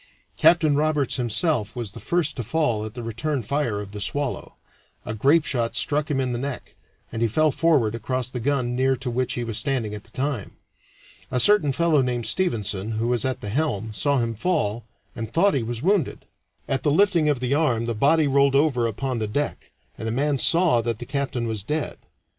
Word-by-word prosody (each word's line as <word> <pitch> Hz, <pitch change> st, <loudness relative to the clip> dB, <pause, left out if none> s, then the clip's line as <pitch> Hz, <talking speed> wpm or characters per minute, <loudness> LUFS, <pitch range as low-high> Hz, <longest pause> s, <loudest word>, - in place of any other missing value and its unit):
Captain 155 Hz, -4 st, +4 dB
Roberts 150 Hz, -2 st, +1 dB
himself 120 Hz, -, 0 dB
was 120 Hz, -5 st, -4 dB
the -, -, -10 dB
first 170 Hz, -3 st, 0 dB
to 120 Hz, -, -4 dB
fall 120 Hz, -4 st, 0 dB
at 110 Hz, -1 st, -7 dB
the 120 Hz, -, -6 dB
return 120 Hz, +4 st, -2 dB
fire 120 Hz, -3 st, -1 dB
of 100 Hz, -1 st, -7 dB
the 105 Hz, 0 st, -7 dB
Swallow; 145 Hz, +4 st, -2 dB, 0.5 s
a 105 Hz, -, -4 dB
grapeshot 135 Hz, -1 st, +1 dB
struck 150 Hz, +2 st, 0 dB
him 140 Hz, -3 st, 0 dB
in 130 Hz, -1 st, -1 dB
the 120 Hz, -, -2 dB
neck, 140 Hz, 0 st, -5 dB, 0.4 s
and 115 Hz, -, -4 dB
he 115 Hz, -, +3 dB
fell 155 Hz, +7 st, +2 dB
forward 140 Hz, -8 st, +2 dB
across 125 Hz, +2 st, -2 dB
the 125 Hz, -1 st, -5 dB
gun 125 Hz, -1 st, 0 dB
near 130 Hz, +1 st, +2 dB
to 130 Hz, -1 st, -4 dB
which 125 Hz, +1 st, -1 dB
he 120 Hz, -, -3 dB
was 115 Hz, -2 st, -1 dB
standing 130 Hz, -7 st, -1 dB
at 105 Hz, -1 st, -7 dB
the -, -, -18 dB
time. 130 Hz, -6 st, -4 dB, 0.7 s
A 125 Hz, -, 0 dB
certain 205 Hz, -4 st, +5 dB
fellow 160 Hz, 0 st, +2 dB
named 125 Hz, -2 st, -2 dB
Stevenson, 110 Hz, -, -1 dB
who 115 Hz, +2 st, -1 dB
was 125 Hz, -1 st, +1 dB
at 130 Hz, -1 st, -2 dB
the 105 Hz, -, -5 dB
helm, 110 Hz, -4 st, -1 dB
saw 140 Hz, +6 st, +1 dB
him 115 Hz, -2 st, 0 dB
fall, 115 Hz, -, -1 dB, 0.3 s
and 115 Hz, -2 st, -5 dB
thought 195 Hz, +9 st, +3 dB
he 135 Hz, -, +1 dB
was 115 Hz, +2 st, -4 dB
wounded. 190 Hz, -5 st, 0 dB, 0.4 s
At 135 Hz, -1 st, 0 dB
the 150 Hz, -, +1 dB
lifting 170 Hz, -1 st, +3 dB
of 145 Hz, -4 st, +1 dB
the 125 Hz, +1 st, -1 dB
arm 130 Hz, -7 st, +1 dB
the 115 Hz, -, -1 dB
body 150 Hz, +8 st, +3 dB
rolled 140 Hz, 0 st, +3 dB
over 135 Hz, -5 st, +2 dB
upon 125 Hz, +3 st, -3 dB
the 110 Hz, -, -1 dB
deck, 145 Hz, +8 st, -3 dB, 0.3 s
and 110 Hz, -, -4 dB
the -, -, -1 dB
man 140 Hz, +3 st, 0 dB
saw 165 Hz, -7 st, +5 dB
that 115 Hz, -1 st, -2 dB
the 120 Hz, -, -7 dB
captain 135 Hz, -2 st, -2 dB
was 110 Hz, -2 st, -3 dB
dead. 150 Hz, +9 st, -3 dB
130 Hz, 210 wpm, -24 LUFS, 115-150 Hz, 0.7 s, certain